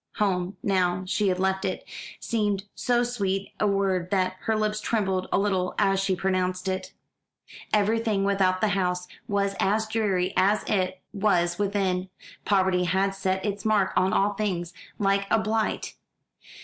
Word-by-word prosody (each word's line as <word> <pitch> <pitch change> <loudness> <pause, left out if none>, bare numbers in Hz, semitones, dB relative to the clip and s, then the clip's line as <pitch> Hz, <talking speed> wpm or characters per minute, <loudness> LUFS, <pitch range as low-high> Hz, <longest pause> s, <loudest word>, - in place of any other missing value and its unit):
Home, 185 -2 0
now 185 -2 +1
she 200 +2 0
had 185 -1 +1
left 190 +1 0
it, 190 - -3 0.3
seemed 205 -4 -1
so 245 -1 +1
sweet 200 -5 -2
a 210 - +2
word 195 -3 0
that 185 -1 +1
her 220 -1 +1
lips 215 0 0
trembled 190 -4 0
a - - +3
little 190 -2 0
as 195 -2 +3
she 195 -1 +1
pronounced 185 0 -1
it. 185 0 -3 0.8
Everything 215 -1 +2
without 195 -2 +2
the 215 - +3
house 180 -2 0 0.2
was 200 -1 0
as 215 +3 +2
dreary 200 -4 0
as 205 +3 +3
it 185 -3 -1
was 180 -4 +1
within. 190 -2 0 0.4
Poverty 190 -2 +2
had 190 +2 +1
set 190 0 -1
its 205 -1 -3
mark 210 -3 +2
on 185 +1 +3
all 205 +1 +2
things, 185 -5 -2 0.2
like 195 -1 +1
a 225 - +4
blight. 220 0 -1
195 Hz, 155 wpm, -26 LUFS, 185-210 Hz, 0.8 s, a